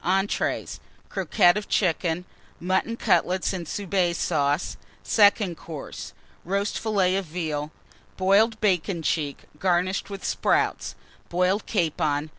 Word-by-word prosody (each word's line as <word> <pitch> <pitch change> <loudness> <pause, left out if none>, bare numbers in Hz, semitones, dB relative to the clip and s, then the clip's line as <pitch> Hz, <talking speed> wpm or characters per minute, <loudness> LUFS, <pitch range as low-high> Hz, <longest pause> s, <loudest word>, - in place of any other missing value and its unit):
ENTREES. 195 +3 0 0.3
Croquettes 180 0 +3
of 210 - -11
Chicken. 175 -2 +1 0.3
Mutton 190 +6 0
Cutlets 180 +1 +1
and 175 -3 -5
Soubise 180 -2 0
Sauce. 145 0 0 0.3
SECOND 205 -4 +4
COURSE. 155 -4 -8 0.3
Roast 200 +3 -1
Fillet 195 -4 +1
of 195 - -2
Veal. 155 -3 -3 0.5
Boiled 210 +4 +3
Bacon 180 -4 +1
cheek 145 -2 -1 0.2
garnished 185 +2 +1
with 195 -1 -7
Sprouts. - - 0 0.3
Boiled 180 +4 +1
Capon. 155 -5 0
180 Hz, 110 wpm, -25 LUFS, 165-195 Hz, 0.5 s, SECOND